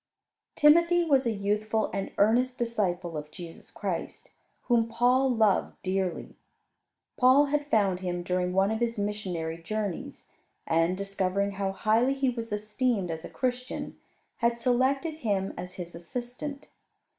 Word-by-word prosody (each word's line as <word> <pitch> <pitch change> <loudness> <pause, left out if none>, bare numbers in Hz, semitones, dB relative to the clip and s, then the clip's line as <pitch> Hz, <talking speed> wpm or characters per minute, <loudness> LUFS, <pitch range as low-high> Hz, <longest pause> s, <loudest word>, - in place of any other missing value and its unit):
Timothy 340 +3 +5
was 275 -5 +3
a - - +2
youthful 215 +1 0
and 195 0 -3
earnest 245 +5 +3
disciple 185 -8 -1
of 150 0 -5
Jesus 165 +1 -10
Christ, - - -5 0.3
whom 235 -2 +2
Paul 250 +3 +3
loved 220 -5 +2
dearly. 185 -1 -2 0.8
Paul 260 +3 +6
had 295 -1 +1
found 200 -8 +2
him 175 -1 -3
during 180 0 0
one 195 +2 +2
of 220 - -1
his 235 -1 -1
missionary 185 -6 -3
journeys, 205 0 -4 0.4
and, 165 +3 +2
discovering 200 0 -1
how 195 -1 -2
highly 225 +7 +2
he 270 -2 +1
was 230 -2 -6
esteemed 210 -2 -1
as 160 0 -5
a - - -7
Christian, 250 0 -3 0.4
had 235 0 +1
selected 260 +6 +1
him 200 -9 -1
as 180 0 -6
his 175 -2 -7
assistant. 250 - -6
215 Hz, 140 wpm, -28 LUFS, 185-250 Hz, 0.8 s, Paul